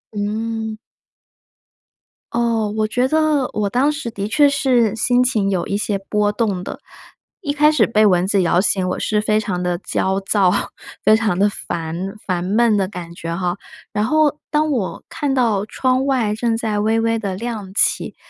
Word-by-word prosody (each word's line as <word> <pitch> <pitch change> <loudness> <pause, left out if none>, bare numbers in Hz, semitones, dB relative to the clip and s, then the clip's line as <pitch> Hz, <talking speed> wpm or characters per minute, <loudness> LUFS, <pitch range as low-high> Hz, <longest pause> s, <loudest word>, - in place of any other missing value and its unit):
嗯。 220 +1 -3 1.6
哦， 230 -2 +1
我 215 0 +1
觉 250 +4 +1
得 310 -2 +2
我 210 -1 -1
当 260 +8 +2
时 290 -5 -5
的 205 -3 -4
确 285 +6 +4
是 250 -6 +2
心 245 +2 +2
情 215 -6 +1
有 180 -3 -1
一 200 - -1
些 205 -1 -1
波 210 -1 +2
动 205 -5 -1
的。 - - -7 0.6
一 290 - -2
开 300 +1 +4
始 265 -8 +3
被 215 -1 +3
蚊 180 -2 +3
子 195 0 +2
咬 175 0 +2
醒 190 -2 +1
我 - - -2
是 210 -1 0
非 215 0 +1
常 185 -4 -3
地 180 -1 -1
焦 190 +1 -1
躁， 195 -2 +2 0.5
非 215 - +6
常 215 -5 0
地 200 - +4
烦 170 +2 -5
烦 180 -2 -1
闷 215 +4 +2
的 190 -2 +1
感 175 -4 -8
觉 165 0 -5
哈， 180 0 -2 0.3
然 210 +1 0
后 300 +2 +2
当 305 0 +1
我 230 -9 -2
看 290 -4 -2
到 230 -7 +1
窗 255 +4 0
外 245 -6 +1
正 225 +1 0
在 215 -2 -1
微 220 +2 +1
微 230 0 +1
地 200 -4 -3
亮 215 -2 -5
起， - - +1
215 Hz, 195 characters per minute, -19 LUFS, 195-245 Hz, 1.6 s, 非